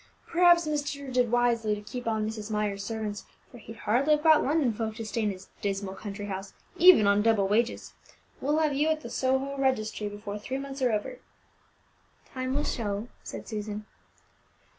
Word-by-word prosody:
"P'r'aps 345 Hz, 0 st, +5 dB
master 285 Hz, -2 st, -3 dB
did 250 Hz, -2 st, +2 dB
wisely 235 Hz, -3 st, +2 dB
to 205 Hz, -, -8 dB
keep 245 Hz, +3 st, -7 dB
on 220 Hz, -1 st, 0 dB
Mrs. 220 Hz, -1 st, -5 dB
Myers' 210 Hz, -2 st, -1 dB
servants, 215 Hz, -1 st, -4 dB, 0.3 s
for 245 Hz, -, -12 dB
he'd 225 Hz, +1 st, -10 dB
hardly 260 Hz, +8 st, +2 dB
have 300 Hz, -, -6 dB
got 315 Hz, -2 st, +6 dB
London 285 Hz, -5 st, +2 dB
folk 220 Hz, 0 st, -3 dB
to 225 Hz, -1 st, -6 dB
stay 220 Hz, +2 st, -2 dB
in 210 Hz, -, +1 dB
his 190 Hz, -1 st, -8 dB
dismal 195 Hz, -1 st, -2 dB
country 205 Hz, 0 st, -6 dB
house, 195 Hz, -1 st, -6 dB, 0.2 s
even 350 Hz, -, +8 dB
on 200 Hz, +1 st, +4 dB
double 215 Hz, -3 st, +3 dB
wages. 230 Hz, +4 st, 0 dB, 0.5 s
We'll 295 Hz, +3 st, +1 dB
have 310 Hz, -2 st, +2 dB
you 290 Hz, +3 st, +1 dB
at 315 Hz, -1 st, 0 dB
the -, -, -8 dB
Soho 265 Hz, +1 st, 0 dB
registry 220 Hz, -5 st, 0 dB
before 205 Hz, 0 st, -6 dB
three 260 Hz, +6 st, -4 dB
months 275 Hz, 0 st, -6 dB
are 250 Hz, -2 st, +3 dB
over." 220 Hz, -, -3 dB, 1.1 s
"Time 255 Hz, 0 st, -2 dB
will 295 Hz, -, +1 dB
show," 210 Hz, -2 st, -3 dB
said -, -, -8 dB
Susan. 210 Hz, -1 st, -5 dB
225 Hz, 185 wpm, -28 LUFS, 210-275 Hz, 1.1 s, even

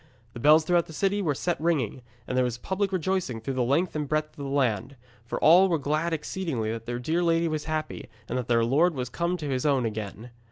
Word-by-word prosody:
The -, -, -8 dB
bells 155 Hz, +5 st, +5 dB
throughout 175 Hz, 0 st, +2 dB
the 160 Hz, -, -10 dB
city 200 Hz, +5 st, 0 dB
were 150 Hz, -7 st, 0 dB
set 175 Hz, +2 st, -2 dB
ringing, 145 Hz, -8 st, 0 dB, 0.2 s
and 125 Hz, -, -4 dB
there 130 Hz, -, +3 dB
was 120 Hz, -1 st, -2 dB
public 190 Hz, +9 st, -2 dB
rejoicing 185 Hz, -8 st, -1 dB
through 125 Hz, +5 st, -4 dB
the 130 Hz, -, -1 dB
length 145 Hz, +9 st, +1 dB
and 150 Hz, -2 st, -2 dB
breadth 155 Hz, 0 st, 0 dB
of -, -, -30 dB
the 135 Hz, -, -4 dB
land, 130 Hz, -2 st, 0 dB, 0.3 s
for -, -, -3 dB
all 180 Hz, +5 st, +7 dB
were 170 Hz, -, +2 dB
glad 155 Hz, +4 st, -1 dB
exceedingly 150 Hz, -8 st, -2 dB
that 115 Hz, 0 st, -6 dB
their 120 Hz, 0 st, -2 dB
dear 160 Hz, +8 st, -1 dB
lady 165 Hz, -1 st, +2 dB
was 155 Hz, -2 st, -3 dB
happy, 155 Hz, -1 st, -4 dB, 0.2 s
and 120 Hz, -, -4 dB
that 125 Hz, -2 st, -2 dB
their 115 Hz, -1 st, +3 dB
lord 155 Hz, +8 st, +3 dB
was 125 Hz, -2 st, -3 dB
come 170 Hz, +5 st, -1 dB
to 150 Hz, -4 st, -5 dB
his 130 Hz, -2 st, -1 dB
own 135 Hz, -5 st, +2 dB
again. 110 Hz, +2 st, -5 dB
150 Hz, 240 wpm, -27 LUFS, 125-170 Hz, 0.3 s, all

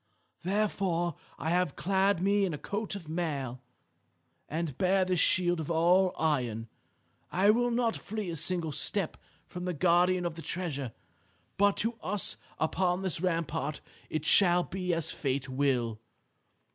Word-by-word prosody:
Therefore 185 Hz, -3 st, 0 dB, 0.2 s
I 160 Hz, -, -2 dB
have 180 Hz, -4 st, +1 dB
clad 190 Hz, +1 st, +1 dB
me 200 Hz, +1 st, +3 dB
in 180 Hz, -5 st, 0 dB
a -, -, -6 dB
coat 205 Hz, +8 st, -4 dB
of 180 Hz, -6 st, -8 dB
mail, 145 Hz, -7 st, -3 dB, 0.9 s
and 160 Hz, -3 st, -3 dB
bear 185 Hz, +3 st, +2 dB
this 185 Hz, -2 st, 0 dB
shield 175 Hz, -3 st, +2 dB
all 175 Hz, +3 st, +4 dB
of -, -, -14 dB
iron. 125 Hz, -8 st, 0 dB, 0.6 s
I 195 Hz, +3 st, +5 dB
will 245 Hz, +2 st, +2 dB
not 235 Hz, -1 st, +1 dB
flee 210 Hz, -4 st, -4 dB
a -, -, -4 dB
single 165 Hz, 0 st, 0 dB
step 185 Hz, +4 st, 0 dB, 0.3 s
from 180 Hz, 0 st, -7 dB
the 180 Hz, -2 st, -2 dB
guardian 180 Hz, +2 st, +3 dB
of 170 Hz, -, -1 dB
the 165 Hz, -, -8 dB
treasure. 150 Hz, -9 st, -3 dB, 0.6 s
But 200 Hz, 0 st, +3 dB
to 230 Hz, 0 st, -2 dB
us 205 Hz, +1 st, 0 dB, 0.2 s
upon 180 Hz, +3 st, 0 dB
this 180 Hz, -4 st, 0 dB
rampart 165 Hz, -4 st, -1 dB, 0.3 s
it 155 Hz, -1 st, -3 dB
shall 180 Hz, -1 st, +6 dB
be 180 Hz, -1 st, -3 dB
as 165 Hz, -2 st, +1 dB
fate 135 Hz, -1 st, -2 dB
will. 130 Hz, -5 st, 0 dB
175 Hz, 150 wpm, -30 LUFS, 155-190 Hz, 0.9 s, shall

